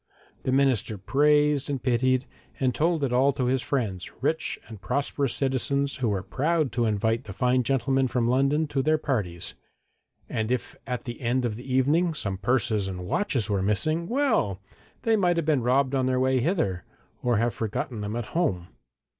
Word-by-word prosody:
The 130 - -1
minister 130 -6 +2
praised 145 +6 +2
and 140 -2 -1
pitied, 130 +1 +2 0.3
and 130 -2 +1
told 165 +1 +1
it 130 -3 0
all 135 +3 +4
to 130 -2 -1
his 130 +1 +1
friends, 105 -11 -2
rich 160 +4 -1
and 110 -4 -10
prosperous 140 +5 -1
citizens 140 +1 0
who 125 -4 0
were 100 -2 -1
proud 155 - 0
to 120 0 0
invite 110 +2 0
the 100 - -7
fine 125 +5 +2
gentleman 135 +1 +1
from 120 -2 0
London 135 +5 +2
to 135 - 0
their 155 +3 +2
parties. 105 - -2 0.7
And 110 +1 -2
if 125 - -2
at 125 -1 -3
the 120 0 -7
end 125 +1 +1
of 110 -3 -2
the 125 +3 -8
evening 155 +6 +2
some 100 -8 -2
purses 110 -2 +1
and 90 -1 -5
watches 125 - 0
were 100 -3 0
missing, 155 - 0
well! 230 - +1 0.4
they 225 -1 +3
might 180 -4 +2
have 165 - 0
been 150 -4 +2
robbed 130 +3 +2
on 130 -1 +1
their 130 0 +1
way 130 0 +2
hither, 125 - 0 0.4
or 120 -2 +2
have 115 +2 +1
forgotten 110 +1 -3
them 105 +2 -3
at 120 -1 -3
home. 95 - 0
130 Hz, 185 wpm, -26 LUFS, 110-140 Hz, 0.7 s, all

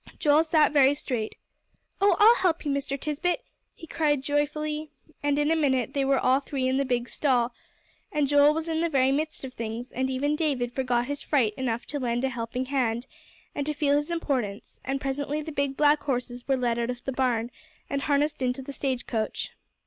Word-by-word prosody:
Joel 300 0 +4
sat 315 -2 +3
very 280 -1 +5
straight. 240 -6 -3 0.7
"Oh, 400 -2 +5
I'll 450 +3 +7
help 340 -4 +1
you, 290 - 0
Mr. 275 0 -2
Tisbett," 305 +5 -1 0.3
he - - -11
cried 295 -4 0
joyfully. 300 +1 -1 0.3
And 290 -1 +1
in 295 +1 +2
a - - +4
minute 265 -6 +1
they 275 - +1
were 270 0 +3
all 260 +1 +3
three 270 -2 -2
in 260 +1 +1
the 275 - +1
big 245 -2 -1
stall, 245 -4 +1 0.6
and 295 -1 +1
Joel 290 +1 +5
was 320 +1 -2
in 320 0 0
the 335 - +1
very 265 -3 +3
midst 305 +2 -2
of 260 -1 -6
things, 230 +2 -5
and 260 +1 -1
even 285 +3 0
David 270 -6 -1
forgot 245 -2 0
his 285 +2 -4
fright 245 -8 +1
enough 235 -1 -2
to 290 - -4
lend 240 -1 -1
a 265 - +2
helping 240 +1 -3
hand, 250 -3 0 0.5
and 285 - -2
to 300 - 0
feel 290 -1 +2
his 295 +2 0
importance, 260 -12 -3
and 270 +1 -2
presently 280 +2 -2
the 315 - -6
big 280 -2 -1
black 295 0 +4
horses 245 -2 -3
were 270 -1 +2
led 240 -2 0
out 235 0 -1
of 245 -1 -5
the 270 - -1
barn, 245 -3 0 0.4
and 280 0 -2
harnessed 290 0 +1
into 255 +1 -1
the 280 - -7
stage 260 -3 -2
coach. 220 -3 -3
275 Hz, 210 wpm, -27 LUFS, 250-295 Hz, 0.7 s, I'll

